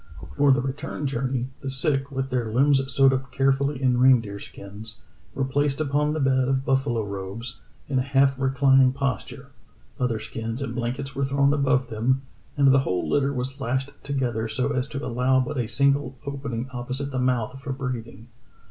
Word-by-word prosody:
For 145 -1 +4
the 135 - +4
return 135 +2 -4
journey: 130 -1 -1
"The 135 - -4
sick, 135 +1 0
with 135 -1 -3
their 120 -3 -1
limbs 135 +3 +4
sewed 135 +1 +5
up 130 -1 -3
carefully 135 +1 +1
in 125 -2 +2
reindeer 115 -6 +4
skins, 105 +4 -10 0.4
were 135 - 0
placed 140 +1 0
upon 150 0 +1
the 155 - -2
bed 130 -2 +2
of 135 0 0
buffalo 135 -5 +1
robes, 100 +4 -6 0.3
in 135 -2 +1
a - - +2
half 135 0 +2
reclining 135 -1 +4
posture; 140 -2 -3 0.5
other 125 -3 +1
skins 115 +2 -5
and 140 - -4
blankets 130 +3 -3
were 140 - -1
thrown 140 +1 +2
above 135 -3 +1
them, 130 +5 +1 0.3
and 140 -1 +5
the 135 - +6
whole 90 -9 -1
litter 140 -1 +2
was 135 +1 -4
lashed 130 +3 -1
together 125 -5 -1
so 110 +4 -1
as 130 +1 -1
to 140 0 -5
allow 125 +2 +2
but 130 +2 -2
a 120 - -1
single 140 +1 +1
opening 135 -4 -4
opposite 130 +3 -4
the 130 - -2
mouth 125 0 0
for 140 - -5
breathing. 120 -4 -5
130 Hz, 180 wpm, -25 LUFS, 125-140 Hz, 0.5 s, the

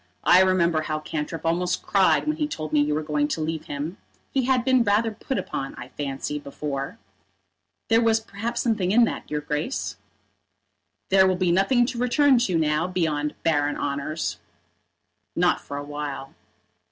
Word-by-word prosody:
I 180 +1 +7
remember 170 -4 +3
how 155 0 -2
Cantrip 155 +1 -5
almost 180 +2 0
cried 195 -2 +3
when 305 0 -1
he 300 -2 0
told 155 - -5
me 150 - +5
you 150 0 +1
were 155 - -1
going 150 -1 0
to 155 - -3
leave 160 0 -3
him. 150 +7 -5 0.3
He 265 -2 +1
had 255 -2 +2
been 260 -2 +4
rather 215 +2 +2
put 260 +5 -4
upon, 135 - -4
I 125 - -9
fancy, 140 +1 -4
before." 140 +4 -5 0.9
"There 225 0 +4
was 225 -1 +3
perhaps 225 +2 -4
something 210 -6 +1
in 235 +3 +6
that, 230 - -2
your 150 0 -2
Grace." 150 - -3 1.1
"There 190 0 +6
will 185 - +2
be 180 -1 +1
nothing 195 +7 +3
to 235 -1 -4
return 260 +1 +4
to 190 -8 +1
now 155 +1 +1
beyond 155 -5 -1
barren 145 -3 +1
honours." 145 +3 -3 1.0
"Not - - +2
for 140 - -7
a 145 - -4
while." 145 -2 -6
170 Hz, 170 wpm, -24 LUFS, 150-225 Hz, 1.1 s, I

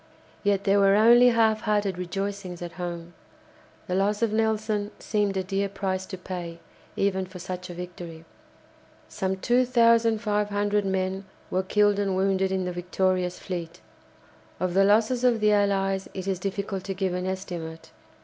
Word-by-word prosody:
Yet 200 -1 +1
there 200 0 +3
were 195 0 +5
only 235 +3 +7
half 225 -2 +3
hearted 205 -4 0
rejoicings 190 -1 -4
at 175 - -6
home. 175 -1 -6 0.7
The 180 - -4
loss 205 +4 +1
of 220 -2 +1
Nelson 215 -1 0
seemed 205 -3 -1
a 190 - 0
dear 195 +1 -1
price 190 -1 -3
to 190 - -6
pay 175 -2 -6 0.4
even 190 -1 0
for 185 0 -10
such 180 +1 -6
a 175 - -7
victory. 175 -2 -8 0.8
Some 190 -2 -2
2500 220 -4 +2
men 190 0 -1 0.3
were 185 - +1
killed 205 +1 +2
and 195 -2 0
wounded 190 0 +1
in 190 -1 -1
the 180 - -2
victorious 180 0 0
fleet. 170 -3 -6 0.8
Of 185 -1 -1
the 195 +1 +4
losses 225 +4 +3
of 245 -3 +3
the 210 0 +3
Allies 195 -1 +1
it 190 -2 -4
is 190 -2 -1
difficult 195 0 -3
to 195 - -3
give 190 -1 -1
an 180 +1 -2
estimate. 175 -4 -6
195 Hz, 160 wpm, -26 LUFS, 185-210 Hz, 0.8 s, only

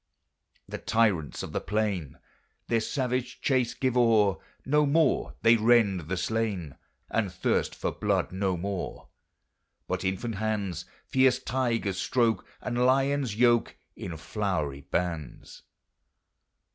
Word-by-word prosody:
The - - -6
tyrants 100 -10 +1
of - - -6
the - - -2
plain 105 -8 -2 0.5
Their 115 - +3
savage 125 +1 -2
chase 130 -4 +1
give 130 -2 0
o'er, 110 -6 +4 0.3
No 150 +1 +3
more 155 0 +2
they 115 +1 +6
rend 105 -7 +3
the 95 - -1
slain, 95 - -2 0.4
And 105 -5 0
thirst 85 - 0
for - - -2
blood - - 0
no 95 -1 -1
more; 95 +1 -5 0.8
But - - -2
infant 95 +4 -2
hands 105 -5 -2 0.2
Fierce 130 -1 +3
tigers 115 -7 -1
stroke, 120 -3 +1
And 120 0 -1
lions 135 -2 +2
yoke 120 0 +3 0.2
In 85 -4 -6
flowery 80 -7 -2
bands. 85 -5 -3
110 Hz, 120 wpm, -28 LUFS, 95-125 Hz, 0.8 s, they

